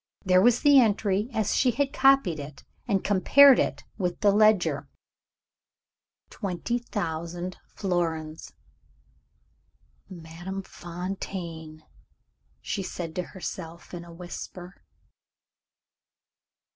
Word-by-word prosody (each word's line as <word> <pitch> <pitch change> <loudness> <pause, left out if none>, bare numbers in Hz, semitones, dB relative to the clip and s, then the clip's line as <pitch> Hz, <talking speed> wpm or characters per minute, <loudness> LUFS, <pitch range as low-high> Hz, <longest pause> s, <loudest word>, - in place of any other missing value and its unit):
There 185 0 +5
was 240 +3 +4
the 285 -2 +7
entry 210 -2 +1
as 220 -3 0
she 255 - +3
had 275 +4 -1
copied 270 - +4
it, 145 0 -9 0.2
and 200 -4 +1
compared 260 +7 +6
it - - -1 0.2
with 180 0 -2
the 205 -2 +5
ledger 180 -9 +3 1.4
"20,000 180 -4 -4
florins." 165 -4 -3 1.6
"Madame 175 +2 -7
Fontaine!" 170 -3 -7 0.8
she 200 - -3
said 175 -3 -6
to 180 - 0 0.2
herself 170 -2 -7
in 175 -1 -6
a 170 - -13
whisper. 180 +1 -9
185 Hz, 95 wpm, -26 LUFS, 170-210 Hz, 1.6 s, the